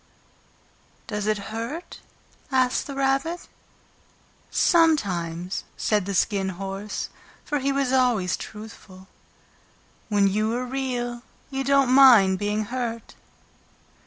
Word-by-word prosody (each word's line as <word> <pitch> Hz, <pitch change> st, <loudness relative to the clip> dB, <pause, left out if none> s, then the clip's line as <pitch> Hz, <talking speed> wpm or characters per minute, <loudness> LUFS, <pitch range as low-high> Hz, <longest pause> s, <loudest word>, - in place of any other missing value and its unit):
"Does 210 Hz, -1 st, -3 dB
it 215 Hz, 0 st, +2 dB, 0.2 s
hurt?" 240 Hz, +10 st, -6 dB, 0.5 s
asked 255 Hz, -1 st, +1 dB
the 280 Hz, -, -6 dB
Rabbit. 275 Hz, +5 st, 0 dB, 1.0 s
"Sometimes," 185 Hz, -, +1 dB
said 210 Hz, -3 st, 0 dB
the 200 Hz, -, -2 dB
Skin 195 Hz, 0 st, +1 dB
Horse, 195 Hz, +2 st, -5 dB, 0.4 s
for 295 Hz, -1 st, -1 dB
he 275 Hz, +1 st, 0 dB
was 275 Hz, -2 st, 0 dB
always 240 Hz, -9 st, +2 dB
truthful. 210 Hz, -3 st, -11 dB, 1.0 s
"When 205 Hz, -2 st, +3 dB
you 215 Hz, +3 st, 0 dB
are 250 Hz, +1 st, -2 dB
Real 245 Hz, -2 st, -3 dB, 0.3 s
you 270 Hz, 0 st, -2 dB
don't 275 Hz, -1 st, +3 dB
mind 230 Hz, -9 st, +7 dB
being 210 Hz, +1 st, -1 dB
hurt." 235 Hz, -1 st, -4 dB
230 Hz, 105 wpm, -24 LUFS, 200-270 Hz, 1.0 s, mind